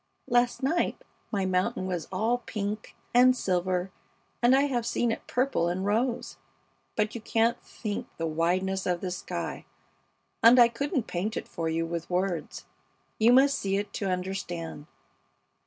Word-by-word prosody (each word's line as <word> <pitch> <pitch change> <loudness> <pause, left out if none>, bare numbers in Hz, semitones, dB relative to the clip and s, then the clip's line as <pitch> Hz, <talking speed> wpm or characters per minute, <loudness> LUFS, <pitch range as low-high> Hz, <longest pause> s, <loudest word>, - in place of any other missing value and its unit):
Last 245 +2 +2
night 325 +6 +1 0.3
my 200 -3 0
mountain 185 0 0
was 180 -4 -3
all 225 +6 +1
pink 210 -2 -5 0.2
and 255 +1 +6
silver, 180 -1 0 0.5
and 245 +2 +6
I 270 - +5
have 255 -5 0
seen 235 0 0
it - - -5
purple 250 -8 +1
and 185 +2 -2
rose. 235 +4 0 0.6
But 215 0 0
you 235 - -6
can't 225 +1 +1
think 210 -3 -5
the 165 - -2
wideness 180 +4 0
of 175 -1 0
the 185 - -3
sky, 180 - -4 0.8
and 235 +2 +8
I 240 -1 +8
couldn't 270 +2 -2
paint 195 +5 -3
it - - -5
for 165 -1 -3
you 165 +1 0
with 170 0 -4
words. 180 -2 -2 0.5
You 225 +2 +6
must 275 +3 +5
see 195 0 0
it 205 0 -4
to 195 - -2
understand. 180 -4 -4
200 Hz, 155 wpm, -28 LUFS, 180-240 Hz, 0.8 s, and